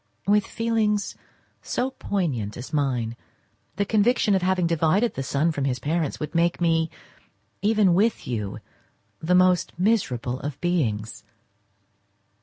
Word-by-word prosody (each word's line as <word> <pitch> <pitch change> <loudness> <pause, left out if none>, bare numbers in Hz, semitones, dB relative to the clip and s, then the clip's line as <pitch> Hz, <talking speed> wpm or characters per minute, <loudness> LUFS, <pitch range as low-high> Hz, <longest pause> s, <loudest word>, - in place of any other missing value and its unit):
With 205 0 +3
feelings 220 -2 0 0.5
so 255 +2 -2
poignant 145 - -2
as 125 +5 -8
mine, 125 -6 0 0.6
the 200 - 0
conviction 220 +1 +2
of 190 - +2
having 185 -1 +1
divided 165 +7 +2
the - - -4
son 140 +4 +1
from 140 -3 -2
his 130 -2 0
parents 155 +3 -2
would 150 - -5
make 170 0 +2
me, 165 -1 +2 0.7
even 210 -3 +3
with 215 +6 +1
you, 105 -5 -3 0.6
the 180 +3 +1
most 180 -1 +3
miserable 150 - 0
of 145 -1 -5
beings. 115 -12 -1
170 Hz, 130 wpm, -24 LUFS, 140-205 Hz, 0.7 s, With